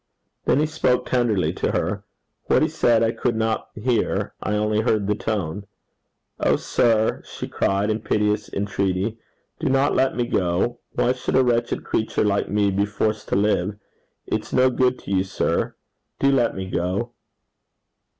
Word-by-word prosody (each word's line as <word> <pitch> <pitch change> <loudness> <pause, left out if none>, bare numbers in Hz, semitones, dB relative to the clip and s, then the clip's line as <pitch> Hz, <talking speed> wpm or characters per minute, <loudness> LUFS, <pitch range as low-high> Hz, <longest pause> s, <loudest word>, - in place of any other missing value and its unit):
Then - - +3
he 155 - +3
spoke 155 -5 +1
tenderly 120 -7 +1
to - - -1
her. 95 +4 -1 0.4
What - - +3
he - - +3
said 115 -1 +2
I 115 - +2
could 120 0 -1
not 110 0 -1
hear 115 +1 0
I 105 +3 -1
only 105 +1 +1
heard 110 -3 +1
the 105 - +1
tone. 100 -2 -3 0.7
'O - - +3
sir!' 110 -2 +1
she - - -7
cried, 100 +2 0
in 110 - -1
piteous 105 -1 0
entreaty, 100 +2 -1 0.4
'do 160 - -1
let 135 0 +2
me 120 - 0
go. 90 +2 0
Why 125 0 +2
should 130 - -3
a 130 - +5
wretched 120 -1 0
creature 110 - 0
like 100 -1 +1
me 100 0 +2
be 100 +2 +1
forced 105 +1 -1
to - - 0
live? 100 -1 +1 0.5
It's 110 0 -3
no 130 0 +4
good 125 0 +2
to - - -6
you, 95 -1 +2
sir. 95 - -1 0.4
Do 140 - +3
let 125 -4 +2
me 95 0 -4
go.' 95 +6 -2
110 Hz, 165 wpm, -23 LUFS, 100-120 Hz, 0.7 s, a